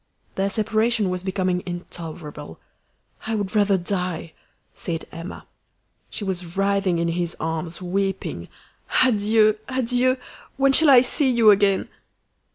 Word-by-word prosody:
Their 195 +1 -1
separation 220 -1 +1
was 180 0 -3
becoming 185 -1 -1
intolerable. 165 - -8 0.7
"I 225 - 0
would 205 -1 -3
rather 205 -2 +3
die!" 180 -3 -3 0.4
said 165 -2 -4
Emma. 165 +2 -8 0.6
She - - -6
was 180 -2 -5
writhing 195 -2 +1
in 170 0 0
his 170 0 -2
arms, 165 +2 -4
weeping. 195 +1 -2 0.6
"Adieu! 215 -2 +3
adieu! 255 0 +1 0.4
When 275 0 +3
shall 315 +2 +6
I 255 -2 +8
see 265 +2 +2
you 235 -4 +6
again?" 200 -1 +2
195 Hz, 125 wpm, -23 LUFS, 175-220 Hz, 0.7 s, I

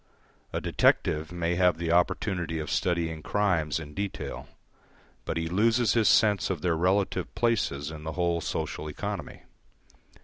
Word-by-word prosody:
A - - -1
detective 75 +1 +1
may 85 -1 -1
have 90 -3 +3
the 85 0 -2
opportunity 90 -1 +1
of 75 -1 -4
studying 85 -3 0
crimes 85 -6 0
in 75 -2 -9
detail, 100 +1 -5 0.8
but - - -2
he 80 0 -1
loses 110 +5 +2
his 115 -3 +3
sense 105 -2 +4
of 90 -6 -3
their 85 -2 +2
relative 95 +4 0
places 90 -11 0
in 75 -1 -9
the 80 0 -4
whole 85 -1 0
social 75 - -3
economy. 95 +2 -5
85 Hz, 145 wpm, -28 LUFS, 80-100 Hz, 0.8 s, sense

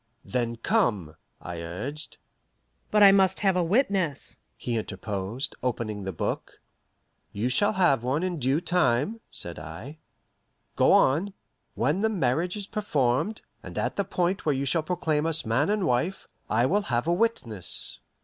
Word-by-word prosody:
"Then 120 -2 -1
come," 115 - 0 0.2
I 85 -1 -6
urged. 130 - -6 0.7
"But 210 -1 +5
I 200 - +10
must 190 -1 +3
have 195 -3 +3
a 180 - +2
witness," 185 - 0 0.2
he 120 - -3
interposed, 105 +3 -3
opening 110 -5 -2
the 95 - -2
book. 80 - -4 0.7
"You 110 +5 -1
shall 205 +12 +3
have 175 - +3
one 130 +7 0
in 180 -3 -2
due 135 +5 +1
time," 175 - +1
said 85 -2 -2
I. 85 - -9 0.8
"Go - - +4
on. 175 +9 +3 0.4
When 150 - +1
the 220 - +2
marriage 175 - 0
is 205 - -4
performed, 160 - 0 0.2
and - - -9
at - - -1
the 200 - +1
point 185 0 -1
where 150 -3 +1
you 135 +1 -1
shall 165 +4 +2
proclaim 155 -2 0
us 160 -1 0
man 120 - +1
and 210 -2 +1
wife, 165 +10 0 0.2
I 115 +3 +3
will 200 +9 +2
have 120 +1 +1
a 170 - +2
witness." 135 - -1
150 Hz, 160 wpm, -27 LUFS, 120-190 Hz, 0.8 s, I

